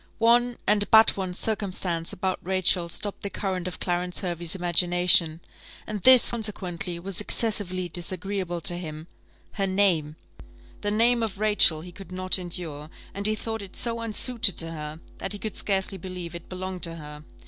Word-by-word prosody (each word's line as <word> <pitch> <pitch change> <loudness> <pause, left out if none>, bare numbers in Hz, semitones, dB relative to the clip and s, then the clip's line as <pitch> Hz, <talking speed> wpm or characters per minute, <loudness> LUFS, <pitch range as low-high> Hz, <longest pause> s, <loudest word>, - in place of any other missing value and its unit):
One, 240 +1 +3
and 205 0 +3
but 220 0 +6
one, 185 -2 -4
circumstance 185 -6 -2
about 190 -1 -3
Rachel 185 -1 +1
stopped 205 +4 -3
the 200 - -4
current 185 -3 -3
of 180 - -7
Clarence 180 0 -2
Hervey's 175 -1 0
imagination, 175 -2 +3 0.4
and 210 -2 -5
this, 255 +1 +7
consequently, 195 -5 -3
was 190 +3 -1
excessively 205 -5 +1
disagreeable 180 +1 -4
to 175 +1 +1
him 155 -2 -8 0.5
her 195 -2 -2
name: 185 -6 +1 0.7
the 205 - -2
name 230 +3 +2
of 220 -4 -3
Rachel 205 -7 +5
he 175 +2 -10
could 195 +1 -12
not 185 +1 +1
endure, 165 -4 -7 0.2
and 200 +1 0
he 215 - 0
thought 225 +1 -5
it 195 -2 -10
so 230 -1 -1
unsuited 230 -3 +1
to 165 0 +1
her, 155 -1 -7 0.2
that - - -4
he - - -5
could 215 +1 -6
scarcely 195 -1 0
believe 180 -1 -7
it 170 -1 -10
belonged 185 0 -6
to 165 -1 0
her. 150 -1 -10
185 Hz, 170 wpm, -25 LUFS, 175-205 Hz, 0.7 s, this